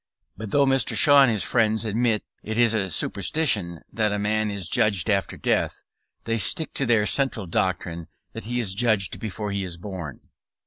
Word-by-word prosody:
But 110 +2 -7
though 140 +5 +3
Mr. 135 -1 +2
Shaw 145 -2 +7
and 135 - +5
his 105 -3 0
friends 110 -1 +1
admit 110 0 0 0.2
it 110 +1 -5
is 120 -2 +4
a 100 -4 0
superstition 95 - 0
that 110 -2 0
a 105 - -1
man 105 +1 0
is 100 -4 -4
judged 105 -2 +1
after 100 -1 -1
death, - - -1 0.4
they 115 0 -1
stick 160 - +1
to 135 - -1
their 115 -3 +3
central 130 -5 0
doctrine, 85 -1 -2 0.3
that - - -6
he 120 +2 -2
is 105 -6 -1
judged 110 -3 0
before 105 -1 -5
he 100 0 -2
is 90 -2 -6
born. 90 -6 -8
105 Hz, 185 wpm, -24 LUFS, 95-115 Hz, 0.4 s, Shaw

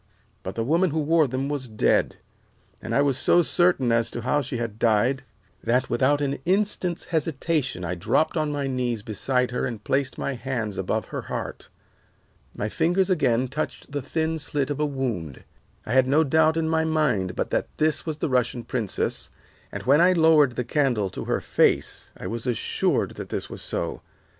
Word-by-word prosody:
But 95 - -6
the 115 - -1
woman 170 +8 +2
who 160 +1 -1
wore 155 0 +3
them 130 +2 -2
was 140 -3 -3
dead, 110 -2 +1 0.7
and - - -3
I 140 - +4
was 140 -2 +1
so 175 +3 +4
certain 175 -9 +2
as 115 0 +2
to 120 - -5
how 130 +5 +1
she 125 -2 -4
had 115 -2 -4
died 120 +4 +2 0.4
that 125 +3 +1
without 145 +2 +2
an 140 -1 -1
instant's 185 -2 0
hesitation 150 - -1
I 85 - -2
dropped 90 - +1
on 155 -2 0
my 145 -1 -2
knees 125 -5 -2
beside 125 +4 0
her 125 - -2
and 115 -4 -6
placed 135 0 0
my 140 - -2
hands 120 -5 -3
above 95 - -2
her - - -2
heart. - - -6 0.9
My 105 - -1
fingers 180 - +1
again 130 -7 +2
touched 150 +2 -5
the 145 0 -2
thin 160 +4 -1
slit 145 -1 -1
of 145 - -3
a 150 - +2
wound. 120 - -4 0.4
I - - -5
had 130 -1 +4
no 150 +4 +4
doubt 160 +2 +3
in 160 -1 0
my 160 0 +2
mind 150 - 0
but - - -2
that - - 0
this 155 0 +1
was 155 -2 -4
the - - -1
Russian 125 -2 0
princess, 115 -6 -2 0.4
and - - -6
when 140 +5 +5
I 180 +1 +6
lowered 160 -6 +5
the 125 - -1
candle 120 -7 0
to - - -6
her - - 0
face - - +1
I - - -9
was 115 +2 -4
assured 120 -3 0
that - - -7
this - - -4
was - - -7
so. - - -3
135 Hz, 190 wpm, -25 LUFS, 120-155 Hz, 0.9 s, I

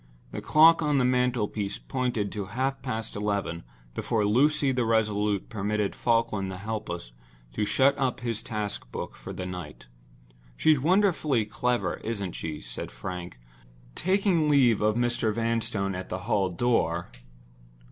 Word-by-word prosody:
The - - -5
clock 165 +2 +6
on 150 -2 +2
the 130 - +3
mantel 125 -3 +2
piece 100 -2 -3
pointed 125 -6 -2
to 105 -2 -4
half 130 +7 -2
past 115 -4 -4
eleven 100 -5 -2 0.3
before 110 - 0
Lucy 140 +6 +3
the 125 -1 +1
resolute 105 -3 +1
permitted 105 -1 -1
Falkland 115 -5 +1
the 95 - -5
helpless 95 - -5 0.4
to 105 - 0
shut 135 +6 +3
up 130 -2 0
his 115 -3 -2
task 105 - -4
book - - -5
for - - -9
the 90 - -5
night. 90 -8 -7 0.7
"She's 155 -3 +4
wonderfully 160 - +2
clever, 120 +3 -1
isn't 100 -5 -4
she?" 80 -2 -5
said - - -6
Frank, 90 -5 -7 0.6
taking 185 - +2
leave 130 -7 +4
of 105 0 +2
Mr. 120 -2 +1
Vanstone 115 -3 -1
at 90 0 -6
the 95 - -4
hall 100 -2 +1
door. 90 -4 0
110 Hz, 145 wpm, -27 LUFS, 100-125 Hz, 0.7 s, clock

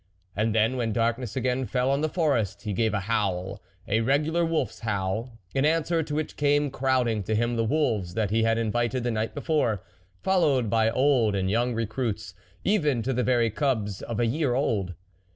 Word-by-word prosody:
And 110 +2 0
then, 110 +4 +2
when 115 -3 -1
darkness 115 0 -1
again 130 0 0
fell 125 +1 +1
on 140 +1 +1
the 155 - 0
Forest, 115 - 0
he 105 - -3
gave 110 +2 +1
a 100 - 0
howl, 100 -3 -1 0.3
a 110 +2 +2
regular 150 +7 +1
wolfs 160 -8 -1
howl, 110 +2 -3 0.2
in 135 - +1
answer 165 +2 +2
to 150 -1 -4
which 155 0 -3
came 145 -1 +2
crowding 125 -5 +1
to 110 +3 -2
him 120 +2 +1
the 115 - +1
wolves 110 - 0
that 105 -3 0
he 110 +1 +2
had 115 0 +2
invited 120 +2 0
the 120 - 0
night 110 0 -2
before, 145 - 0 0.4
followed 150 - +2
by 110 -1 +3
old 120 -4 +2
and 95 -1 0
young 120 +2 +1
recruits, 115 0 -3 0.3
even 150 - +1
to 130 +3 -1
the 125 - 0
very 120 -3 +2
cubs 110 -6 -1
of 115 -1 -4
a 120 - +3
year 130 +1 0
old. 100 -9 -1
120 Hz, 190 wpm, -26 LUFS, 110-135 Hz, 0.4 s, by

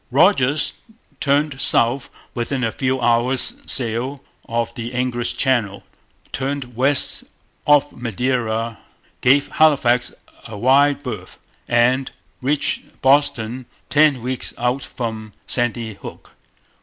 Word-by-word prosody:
Rodgers 145 -1 +3 0.4
turned 140 0 +1
south 120 0 +3 0.2
within 125 +2 -2
a 115 - +1
few 130 +1 -1
hours' 120 +2 +1
sail 125 +3 -1 0.3
of 115 0 -1
the 120 0 -6
English 125 -1 -1
Channel, 120 -7 0 0.5
turned 135 -2 -4
west 135 +3 +1 0.4
off 145 -1 +5
Madeira, 115 -1 -2 0.4
gave 140 +3 +4
Halifax 130 -6 +3 0.4
a 110 -2 -8
wide 140 +5 +3
berth, 125 - -7 0.3
and 125 +2 +2 0.3
reached 140 +3 -2
Boston 130 -3 +2 0.2
ten 145 -4 +4
weeks 130 0 -4
out 125 +3 0
from 110 -3 -6
Sandy 120 -2 0
Hook. - - -11
125 Hz, 105 wpm, -20 LUFS, 120-140 Hz, 0.5 s, off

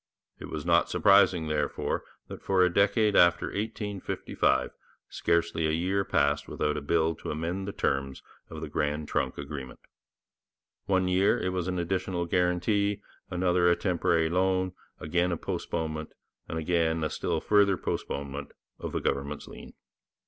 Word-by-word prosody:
It - - -8
was - - -5
not - - +3
surprising, 95 -4 +4
therefore, 75 0 -1 0.2
that - - -9
for 95 -1 +3
a 90 - 0
decade 105 +2 +3
after 85 0 +5
1855 105 -2 -1 0.4
scarcely 85 -1 0
a 80 - 0
year 95 +4 +1
passed 75 -6 +1
without 75 0 -1
a - - -3
bill 80 +3 +1
to - - -7
amend 85 +6 -3
the - - -2
terms 70 -6 -2 0.3
of 80 -1 -8
the 80 - -4
Grand 75 0 -2
Trunk - - -1
agreement. 70 -2 -7 1.1
One 95 -2 +2
year 95 +2 +3
it 90 - -1
was 90 -1 -2
an 90 0 -2
additional 90 0 -1
guarantee, 95 +4 +1 0.3
another 90 -1 +2
a 85 - +4
temporary 85 -3 +1
loan, 95 +1 +1 0.3
again 85 +3 0
a 85 - -1
postponement, 80 -1 -4 0.4
and 80 - -3
again 80 -1 +1
a 75 - 0
still - - -1
further 100 -2 +3
postponement 70 0 -4 0.3
of - - -5
the - - -1
government's 70 +2 -2
lien. - - -11
85 Hz, 150 wpm, -28 LUFS, 80-95 Hz, 1.1 s, after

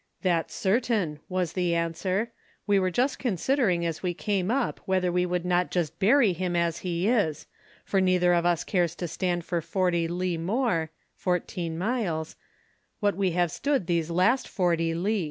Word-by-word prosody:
"That's 170 -3 0
certain," 200 -7 0
was 180 -3 -1
the 175 -2 0
answer. 185 +6 -1 0.3
"We 205 -2 +3
were 185 -1 +1
just 250 +9 0
considering 215 - +1
as 165 -2 -3
we 180 -2 -2
came 195 -1 -1
up 260 +1 0
whether 185 -1 +1
we 180 0 +1
would 180 0 -2
not 180 0 +1
just 170 -5 -2
bury 220 0 +4
him 180 0 -2
as 170 -1 0
he 175 +1 -1
is, 200 - +1 0.4
for 195 - +1
neither 180 -1 +3
of 170 -1 +2
us 175 -2 +1
cares 175 -4 0
to 175 - -4
stand 175 0 -2
for 170 -2 -1
forty 170 0 0
li 175 0 -2
more 185 -3 0 0.3
(14 175 -2 -2
miles) 180 -6 -2 0.6
what 205 -1 +1
we 190 -3 0
have 175 -1 +1
stood 280 - 0
those 170 -2 0
last 185 +10 +2
forty 165 -3 0
li." 200 +5 0
180 Hz, 175 wpm, -27 LUFS, 170-195 Hz, 0.6 s, bury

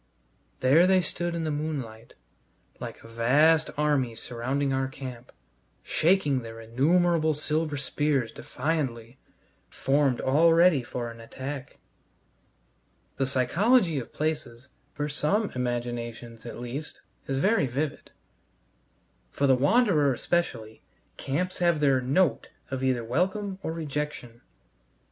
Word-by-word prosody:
There 150 +8 +5
they 190 -1 +4
stood 175 +1 -3
in 165 - -2
the 155 - -1
moonlight, 140 -7 -5 0.6
like - - -8
a - - -12
vast 145 +8 +3
army 145 -6 +1
surrounding 130 +5 -2
our 135 0 0
camp, 130 -2 -9 0.5
shaking 155 -6 +2
their 115 -1 -9
innumerable 155 +7 +2
silver 155 0 -1
spears 140 -3 0
defiantly, 130 -5 -3 0.5
formed 135 -2 +1
all 160 +5 +4
ready 170 -4 +5
for 120 0 -5
an 115 - -13
attack. 130 +4 -7 1.4
The 135 - 0
psychology 165 - +2
of 120 - -8
places, 140 -5 -3 0.2
for 145 - -3
some 175 +9 0
imaginations 120 -2 -4
at - - -7
least, 125 +5 -6 0.3
is 135 - -1
very 190 0 +2
vivid; 140 +4 -3 1.2
for 140 - -1
the 135 - +5
wanderer, 150 - +3
especially, 115 -10 -2 0.4
camps 180 +7 -2
have 170 -3 +3
their 135 -3 +3
"note" 135 +1 +1 0.2
either 130 -2 0
of - - -10
welcome 190 - -1
or 160 - -3
rejection. 150 -6 -5
140 Hz, 120 wpm, -27 LUFS, 125-160 Hz, 1.4 s, There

